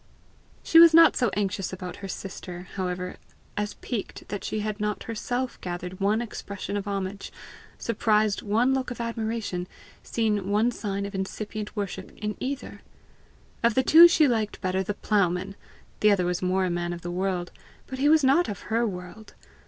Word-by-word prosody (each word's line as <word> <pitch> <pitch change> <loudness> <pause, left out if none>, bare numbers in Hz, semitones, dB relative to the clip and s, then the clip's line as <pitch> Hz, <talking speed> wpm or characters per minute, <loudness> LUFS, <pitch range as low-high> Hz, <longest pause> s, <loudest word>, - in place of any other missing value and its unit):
She 330 - +6
was 335 -1 +9
not 330 0 +8
so 245 - +2
anxious 195 -2 -1
about 185 -1 -6
her 195 - -7
sister, 180 -2 -7
however, 180 -1 -3 0.4
as 210 0 -2
piqued 230 -5 -5
that 205 - -4
she 215 - -2
had 215 0 -3
not 210 0 -2
herself 245 +3 -3
gathered 180 +1 -5
one 210 +4 +2
expression 200 -3 -6
of 205 0 -3
homage, 195 0 -4 0.5
surprised 215 -3 +1
one 230 +5 +2
look 265 -1 -1
of 245 - -7
admiration, 225 -5 -3 0.3
seen 210 -4 -1
one 215 +4 +3
sign 200 -3 -3
of 200 - -7
incipient 210 +3 -5
worship 200 -3 -4
in 210 0 -3
either. 275 +1 -5 0.8
Of 235 -1 +3
the 260 - +3
two 330 +6 +9
she 320 -3 +4
liked 220 -4 -1
better 185 +1 0
the 195 +2 -3
ploughman! 195 -2 0 0.4
The 210 - +5
other 195 -3 +3
was 180 0 -1
more 185 +1 +1
a 180 - -1
man 175 0 -2
of 170 - -7
the 175 - -4
world 180 -1 -2 0.3
but 260 - -7
he 290 +2 +4
was 315 -1 +5
not 275 +7 +4
of 205 +1 -7
her 230 +1 +2
world! 185 +3 -8
205 Hz, 175 wpm, -26 LUFS, 185-230 Hz, 0.8 s, was